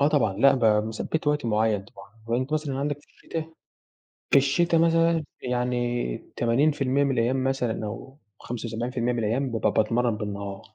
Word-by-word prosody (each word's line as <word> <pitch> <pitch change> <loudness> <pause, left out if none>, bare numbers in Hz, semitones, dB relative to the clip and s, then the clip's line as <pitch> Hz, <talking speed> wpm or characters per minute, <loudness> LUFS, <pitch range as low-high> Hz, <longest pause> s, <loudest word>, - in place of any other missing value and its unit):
آه 140 - +5
طبعًا 140 -10 +2
لأ 135 +6 +5
ب 125 -3 -1 0.2
مثبّت 130 +8 -3
وقت 150 -3 +1
معيّن 105 -2 +1
طبعًا، 100 0 -15 0.2
أهو 115 - +1
أنت 130 +4 -2
مثلًا 150 -3 -1
عنَدك 145 +1 -1
في - - -26
الشتا 160 0 -7 0.8
في - - +7
الشتا 165 +5 +3
مثلًا 165 0 +3 0.2
يعني 120 - -1 0.2
80% 135 +3 +2
من 140 - +1
الأيام 130 +2 +1
مثلًا 125 -5 -1
أو 125 +6 -8 0.2
75% 120 +1 -3
من 120 - -2
الأيام 120 +5 0
بابقى 115 - +1
باتمرّن 115 +1 +1
بالنهار 100 -1 -6
125 Hz, 160 wpm, -26 LUFS, 115-140 Hz, 0.8 s, في